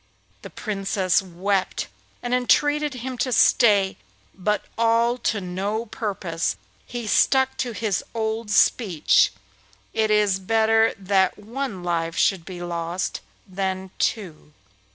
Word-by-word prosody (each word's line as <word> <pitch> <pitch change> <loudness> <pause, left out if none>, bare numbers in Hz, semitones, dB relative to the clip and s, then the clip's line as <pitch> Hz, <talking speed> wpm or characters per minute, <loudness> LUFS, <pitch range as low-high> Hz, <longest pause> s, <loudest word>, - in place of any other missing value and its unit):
The - - -9
Princess 195 -3 0
wept 190 +1 -2 0.4
and 245 0 -2
entreated 290 +4 +2
him 250 0 -6
to 255 - 0
stay, 205 -5 +4 0.4
but 210 +2 -1
all 230 +2 +2
to 225 -3 0
no 200 +5 -3
purpose. 195 -8 -3 0.3
He 240 -1 -5
stuck 265 +4 +3
to 245 - -2
his 215 -3 -1
old 220 0 -2
speech, 200 -5 +3 0.6
'It 220 -1 +1
is 210 -2 +3
better 225 +3 +2
that 195 -1 +1
one 220 -2 -5
life 165 -1 -2
should 185 -4 +2
be 180 -1 -7
lost 170 +1 -3 0.3
than 190 0 -3
two. 165 -8 -3
205 Hz, 120 wpm, -23 LUFS, 185-230 Hz, 0.6 s, stay